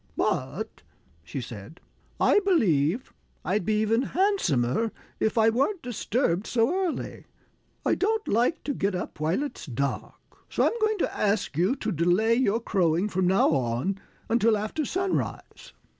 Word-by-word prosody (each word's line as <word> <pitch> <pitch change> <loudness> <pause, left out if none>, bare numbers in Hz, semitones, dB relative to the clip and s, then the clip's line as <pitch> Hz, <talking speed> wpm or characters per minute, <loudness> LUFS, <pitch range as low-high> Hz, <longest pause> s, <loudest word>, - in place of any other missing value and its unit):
"But," - - -2 0.4
she 90 +11 -5
said, 115 - -9 0.4
"I - - +5
believe 215 - +1 0.3
I'd 195 +2 0
be 210 +3 +1
even 225 +2 +2 0.2
handsomer 225 - +1 0.3
if 220 +1 0
I 225 0 +5
weren't 280 - 0
disturbed 220 -5 -1
so 230 +6 +2
early. 370 -3 -3 0.6
I - - +3
don't 440 +2 0
like 240 +9 +1
to 285 - -2
get 200 -5 -1
up 180 - -5
while 160 - 0
it's 285 - -7
dark. 135 +2 -3 0.3
So - - +1
I'm - - +2
going 435 0 +2
to - - -1
ask 205 -6 0
you 185 - +2
to 225 -5 -3
delay 180 +7 +2
your 230 -3 +2
crowing, 180 -3 +1
from 185 -2 0
now 190 +2 +4
on, 130 +10 0 0.3
until 225 -1 +3
after 215 +9 -2
sunrise." 375 +6 -3
215 Hz, 150 wpm, -26 LUFS, 175-260 Hz, 0.6 s, I